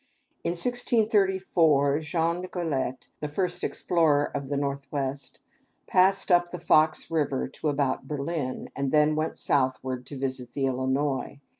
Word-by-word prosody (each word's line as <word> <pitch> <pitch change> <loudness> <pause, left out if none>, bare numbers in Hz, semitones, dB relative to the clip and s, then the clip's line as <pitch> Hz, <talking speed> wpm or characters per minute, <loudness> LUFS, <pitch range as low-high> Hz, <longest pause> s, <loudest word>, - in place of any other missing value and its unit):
In 170 - 0
1634, 190 - +2
Jean 165 +2 -1
Nicolet, 160 -8 -3
the 150 - -3
first 180 +4 -2
explorer 155 -4 +2
of 140 -1 -4
the 145 - -1
Northwest, 140 -1 -3 0.5
passed 190 +1 +3
up 175 0 +4
the 180 - -6
Fox 155 -2 +2
River, 145 -4 0
to 135 - -5
about 140 -2 0
Berlin, 145 -2 -3
and 140 -1 -1
then 150 0 +4
went 155 +1 -2
southward 130 -2 0
to 140 - -7
visit 130 -2 -4
the 135 - 0
Illinois. 135 +2 -1
150 Hz, 135 wpm, -27 LUFS, 135-170 Hz, 0.5 s, up